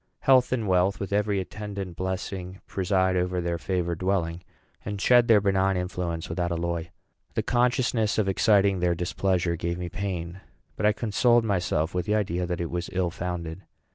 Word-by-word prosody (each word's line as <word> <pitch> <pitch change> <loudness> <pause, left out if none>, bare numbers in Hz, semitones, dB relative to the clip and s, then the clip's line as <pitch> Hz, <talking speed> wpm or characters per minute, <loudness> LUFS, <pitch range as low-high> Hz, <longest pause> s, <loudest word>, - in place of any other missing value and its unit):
Health 130 -2 +4
and 115 -5 0
wealth, 95 +2 +2
with 100 0 -4
every 105 -1 +1
attendant 100 -2 -6
blessing, 95 0 -4
preside 95 -1 +1
over 90 0 0
their 85 -1 -2
favored 85 -2 -2
dwelling, 90 -3 -1 0.4
and 105 -1 -4
shed 120 +3 +5
their 110 -3 +6
benign 95 -1 +2
influence 90 -2 -3
without 85 +1 -2
alloy." 85 0 -2 0.5
The - - 0
consciousness 120 -3 +1
of 110 -3 +2
exciting 100 -1 +3
their 90 0 +1
displeasure 90 0 0
gave 85 +1 -3
me 90 -1 -4
pain; 90 0 -4 0.3
but 105 - +1
I - - +5
consoled 115 +2 +2
myself 90 -5 0
with 90 +2 -2
the 105 - +2
idea 90 -4 -1
that 90 -1 -3
it 85 - -3
was 85 0 -3
ill 90 -1 0
founded. 85 -1 -5
95 Hz, 170 wpm, -26 LUFS, 85-100 Hz, 0.5 s, their